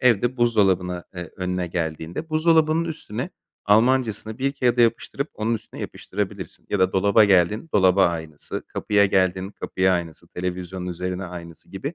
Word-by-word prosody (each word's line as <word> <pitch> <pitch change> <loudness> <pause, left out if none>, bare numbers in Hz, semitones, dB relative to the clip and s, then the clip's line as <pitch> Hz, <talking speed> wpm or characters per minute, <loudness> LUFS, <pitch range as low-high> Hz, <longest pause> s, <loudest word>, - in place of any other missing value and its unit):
evde 120 0 +3
buzdolabına, 95 -7 +2
eee, 90 -2 -6
önüne 90 -1 -2
geldiğinde 85 - -4
buzdolabının 160 0 +3
üstüne 145 - -5 0.3
Almancasını 110 0 +2
bir 135 +1 0
kağıda 125 -3 +1
yapıştırıp, 120 +5 +1
onun 110 +2 0
üstüne 115 - -8
yapıştırabilirsin 100 -2 -5
ya 100 - +1
da 95 0 +3
dolaba 100 +3 +5
geldin, 100 - +3
dolaba 95 -1 +5
aynısı, 80 -3 -4
kapıya 100 -1 +2
geldin, 95 0 +1
kapıya 95 -2 0
aynısı, 85 -3 -4
televizyonun 90 0 -4
üzerine 90 +1 -4
aynısı 85 -2 -10
gibi. 140 - -5
95 Hz, 140 wpm, -23 LUFS, 90-120 Hz, 0.3 s, dolaba